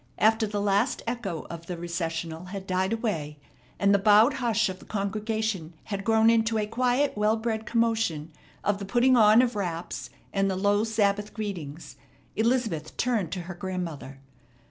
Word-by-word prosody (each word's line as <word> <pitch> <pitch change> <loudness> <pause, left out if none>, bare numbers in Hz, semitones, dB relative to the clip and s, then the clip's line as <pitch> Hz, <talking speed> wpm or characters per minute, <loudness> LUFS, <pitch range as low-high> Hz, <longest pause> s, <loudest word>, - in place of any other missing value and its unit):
After 220 +1 +3
the 205 0 -3
last 205 +5 +1
echo 225 -9 -4
of 170 0 -8
the 180 - -4
recessional 165 -1 -4
had 190 +1 -7
died 185 +1 0
away, 180 -11 -2 0.4
and 200 0 +3
the 200 - +4
bowed 215 +6 +6
hush 230 -4 +1
of 185 -1 -6
the - - -15
congregation 210 -4 -2
had 200 -2 -4
grown 225 +1 +4
into 225 0 +2
a 210 - 0
quiet, 250 +5 +1
well 210 +1 +2
bred 220 -1 -3
commotion 225 -10 0 0.3
of 205 -1 0
the 200 - -5
putting 245 +5 +3
on 220 +1 +7
of 245 -2 -1
wraps 175 -4 -4 0.2
and 195 0 +1
the 190 - -1
low 205 +2 +2
Sabbath 210 -2 0
greetings, 165 - -6 0.4
Elizabeth 220 -9 0
turned 230 -8 0
to 185 - -3
her 175 +2 -7
grandmother. 175 -7 -5
205 Hz, 165 wpm, -27 LUFS, 180-225 Hz, 0.4 s, on